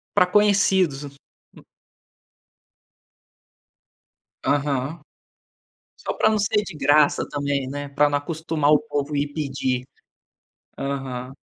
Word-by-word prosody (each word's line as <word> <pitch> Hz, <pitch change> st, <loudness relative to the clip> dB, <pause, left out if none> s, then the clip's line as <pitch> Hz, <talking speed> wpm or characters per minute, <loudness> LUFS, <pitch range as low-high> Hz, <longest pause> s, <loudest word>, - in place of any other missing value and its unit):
Para 180 Hz, -, +5 dB
conhecidos. 190 Hz, -7 st, +3 dB, 0.5 s
Hum -, -, -15 dB, 2.8 s
Aham, 145 Hz, +2 st, -1 dB, 1.0 s
só -, -, -4 dB
para -, -, +3 dB
não 215 Hz, -, +1 dB
ser 210 Hz, +1 st, +1 dB
de 165 Hz, -, -8 dB
graça 145 Hz, +1 st, +3 dB
também, 140 Hz, -2 st, -2 dB
né, 145 Hz, +1 st, -5 dB
para 145 Hz, +1 st, +3 dB
não 145 Hz, -, +1 dB
acostumar 155 Hz, 0 st, -1 dB
o 150 Hz, -, +5 dB
povo 145 Hz, -1 st, -3 dB
ir 145 Hz, 0 st, -1 dB
pedir. 135 Hz, -4 st, -2 dB, 0.9 s
Aham. 135 Hz, -2 st, -4 dB
145 Hz, 105 wpm, -23 LUFS, 140-160 Hz, 2.8 s, Para